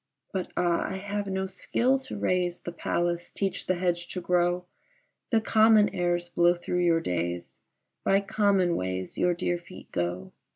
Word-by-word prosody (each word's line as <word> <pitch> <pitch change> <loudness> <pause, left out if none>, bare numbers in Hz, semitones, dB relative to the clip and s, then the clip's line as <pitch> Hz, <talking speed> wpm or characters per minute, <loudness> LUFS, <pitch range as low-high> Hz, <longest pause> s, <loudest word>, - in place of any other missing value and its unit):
But 190 -2 -2
ah! 175 -1 +2
I 190 - -4
have 205 +1 -3
no 190 0 -1
skill 250 +7 +1
to 260 -4 -7
raise 180 -3 0
The 175 - -5
palace, 175 0 -1
teach 195 -2 -2
the 185 - +2
hedge 175 -1 -1
to 185 - -5
grow; 175 0 +1 0.6
The 225 -3 +3
common 220 -1 +5
airs 175 -1 -1
blow 175 0 +3
through 175 0 -2
your 165 -1 +3
days, 85 - -2 0.5
By 195 +1 +3
common 195 -3 +2
ways 95 0 -3
your 180 -1 +3
dear 175 0 -1
feet 175 +2 -13
go. 90 +2 -2
175 Hz, 165 wpm, -28 LUFS, 170-195 Hz, 0.6 s, common